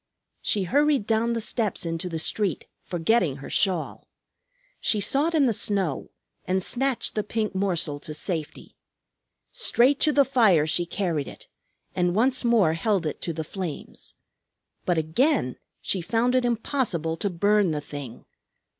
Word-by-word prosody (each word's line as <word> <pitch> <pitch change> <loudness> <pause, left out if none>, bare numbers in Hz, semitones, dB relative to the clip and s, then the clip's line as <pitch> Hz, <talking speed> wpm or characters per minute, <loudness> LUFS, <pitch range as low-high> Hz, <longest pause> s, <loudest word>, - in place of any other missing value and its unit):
She 205 - +1
hurried 285 - +2
down 225 +1 +1
the 230 - -1
steps 215 -4 -1
into 165 +2 -3
the 165 - -3
street, 195 +4 0 0.2
forgetting 175 - +1
her 135 0 -9
shawl. 185 -5 0 0.7
She 215 - +2
sought 285 - +1
in 295 -3 +4
the 235 - +2
snow 190 -9 -1 0.4
and 190 0 0
snatched 265 +3 0
the 215 - 0
pink 215 0 -2
morsel 180 -7 0
to 150 +1 -7
safety. 160 -1 -4 0.8
Straight 285 - +3
to 305 - +3
the 285 -2 +4
fire 215 - +4
she 170 +3 0
carried 170 -6 -2
it, - - -12 0.5
and 175 0 +1
once 255 +4 +2
more 225 -9 +3
held 190 +1 0
it 155 - -4
to 170 - -2
the 160 0 -4
flames. 175 -1 -7 0.7
But 175 -2 +1
again 160 - +1 0.3
she 190 - -1
found 230 +7 +1
it 255 -1 +2
impossible 225 - -1
to 200 - -1
burn 205 +2 +2
the 155 -2 -1
thing. 140 -5 -9
195 Hz, 155 wpm, -25 LUFS, 165-235 Hz, 0.8 s, in